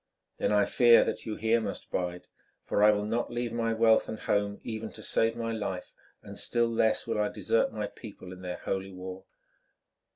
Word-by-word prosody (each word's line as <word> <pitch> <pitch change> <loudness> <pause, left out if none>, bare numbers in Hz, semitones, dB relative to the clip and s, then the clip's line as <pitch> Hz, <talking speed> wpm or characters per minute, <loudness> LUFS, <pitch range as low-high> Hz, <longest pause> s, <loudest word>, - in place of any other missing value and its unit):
"Then - - +1
I 105 -1 +4
fear 120 -2 +6
that - - -4
you 110 - -2
here 115 +1 +2
must 100 -2 -5
bide, 90 -1 -3 0.4
for 105 - +1
I 105 - +8
will 105 -1 +2
not 115 +3 -1
leave 120 -1 -3
my 115 -1 0
wealth 110 0 +4
and 110 - -4
home, 100 0 0
even 110 -1 -5
to - - -8
save 115 0 +1
my 115 -1 -3
life, 100 -5 -4 0.3
and - - -7
still 120 0 +2
less 110 -1 +2
will 115 -2 0
I 105 - +1
desert 115 - +1
my 105 -1 -3
people 100 -3 -10
in 90 - -12
their 90 -1 -5
holy 95 0 -3
war. 95 0 -8
110 Hz, 200 wpm, -29 LUFS, 100-115 Hz, 0.4 s, I